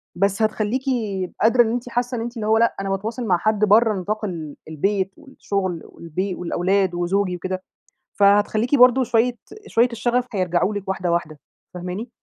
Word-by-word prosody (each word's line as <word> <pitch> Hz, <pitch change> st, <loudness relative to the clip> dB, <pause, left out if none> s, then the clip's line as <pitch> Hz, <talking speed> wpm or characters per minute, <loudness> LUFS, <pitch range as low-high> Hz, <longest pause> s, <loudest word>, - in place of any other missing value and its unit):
بس 195 Hz, +3 st, +1 dB
هتخليكِ 215 Hz, +3 st, 0 dB, 0.6 s
قادرة 235 Hz, +3 st, +5 dB
إن 225 Hz, -, -2 dB
أنتِ 245 Hz, +1 st, -3 dB
حاسة 245 Hz, +1 st, -1 dB
أنتِ 235 Hz, +1 st, -5 dB
اللي 215 Hz, -1 st, -3 dB
هو 220 Hz, +1 st, +4 dB
لأ، 230 Hz, +1 st, +2 dB
أنا 195 Hz, -, -3 dB
باتواصل 220 Hz, +5 st, -3 dB
مع 180 Hz, -3 st, +3 dB
حد 215 Hz, +4 st, 0 dB
برا 215 Hz, +1 st, +4 dB
نطاق 215 Hz, +4 st, -3 dB
ال 160 Hz, -6 st, -6 dB
البيت، 190 Hz, +5 st, -1 dB
والشغل، 195 Hz, -, -4 dB
والبي 180 Hz, +3 st, -4 dB
والأولاد، 185 Hz, +2 st, 0 dB
وزوجي 180 Hz, +2 st, 0 dB
وكده، 185 Hz, +2 st, -4 dB, 0.5 s
فهتخليكِ 205 Hz, +5 st, +3 dB
برضه 255 Hz, 0 st, +6 dB
شوية 240 Hz, 0 st, +1 dB, 0.3 s
شوية 235 Hz, +2 st, +3 dB
الشغف 240 Hz, +2 st, 0 dB
حيرجعوا 185 Hz, 0 st, 0 dB
لِك 200 Hz, -1 st, -5 dB
واحدة 180 Hz, -2 st, -1 dB
واحدة، 160 Hz, -3 st, -2 dB, 0.3 s
فاهماني؟ 180 Hz, +6 st, -5 dB
205 Hz, 160 wpm, -22 LUFS, 185-230 Hz, 0.6 s, برضه